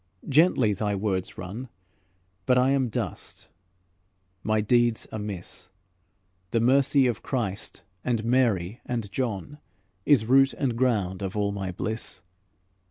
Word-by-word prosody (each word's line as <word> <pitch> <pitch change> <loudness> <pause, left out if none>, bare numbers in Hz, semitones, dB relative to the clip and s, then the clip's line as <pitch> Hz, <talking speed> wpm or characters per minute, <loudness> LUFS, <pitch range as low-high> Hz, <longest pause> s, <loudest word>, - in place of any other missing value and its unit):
Gently 135 - +4
thy 105 +1 -1
words 95 -2 -2
run, 105 +8 -7 0.8
But 125 - +4
I 130 +2 +4
am 135 -3 +1
dust, - - -5 0.9
my 110 +1 +1
deeds 120 +1 +2
amiss; 95 -3 -7 0.8
The 115 - +1
mercy 135 +3 +4
of 120 -3 0
Christ 105 -7 -3 0.2
and 115 -3 -1
Mary 115 -5 +1
and 115 -5 -4
John 125 +5 -3 0.5
Is 135 -7 +5
root 135 +3 +5
and 130 -5 -1
ground 105 -7 0
of 95 +1 -4
all 100 -1 +1
my 95 -2 -4
bliss." 100 0 -3
110 Hz, 125 wpm, -26 LUFS, 100-125 Hz, 0.9 s, Is